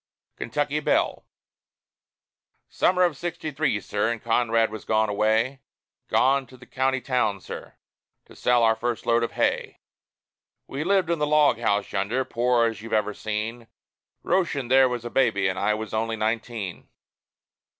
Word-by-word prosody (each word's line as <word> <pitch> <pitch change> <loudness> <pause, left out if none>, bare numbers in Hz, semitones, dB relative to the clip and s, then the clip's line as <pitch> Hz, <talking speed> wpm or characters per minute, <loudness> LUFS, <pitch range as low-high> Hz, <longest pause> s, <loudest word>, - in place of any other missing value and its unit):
KENTUCKY 145 +4 -1
BELLE 150 - 0 1.4
Summer 180 0 +2
of 175 -4 +2
'sixty 170 +1 -5
three, 140 -7 0
sir, 105 +2 -1
and 120 - -3
Conrad 115 -1 +2
was 110 -1 -7
gone 110 -1 +1
away 110 +6 +1 0.5
Gone 135 0 +2
to 130 - -15
the 125 - -15
county 130 +1 0
town, 125 -6 0
sir, - - -9 0.5
to - - -17
sell 120 -1 +2
our 110 0 +4
first 120 +1 -3
load 115 0 +3
of 115 - -2
hay - - -1 0.9
We 140 +3 -4
lived 185 -1 +2
in 170 - 0
the 150 - +1
log 150 -5 +4
house 105 -3 0
yonder, 110 +7 -1
poor 120 0 +2
as 115 -1 -3
you've 115 0 -7
ever 105 -1 +1
seen; 110 +3 -4 0.6
Röschen 165 -9 0
there 130 0 +6
was 120 -1 -4
a 120 - -5
baby, 110 -7 +2
and 95 0 -2
I 105 +1 +1
was 110 0 -6
only 110 +1 -1
nineteen. 110 -3 -3
120 Hz, 160 wpm, -25 LUFS, 110-135 Hz, 1.4 s, there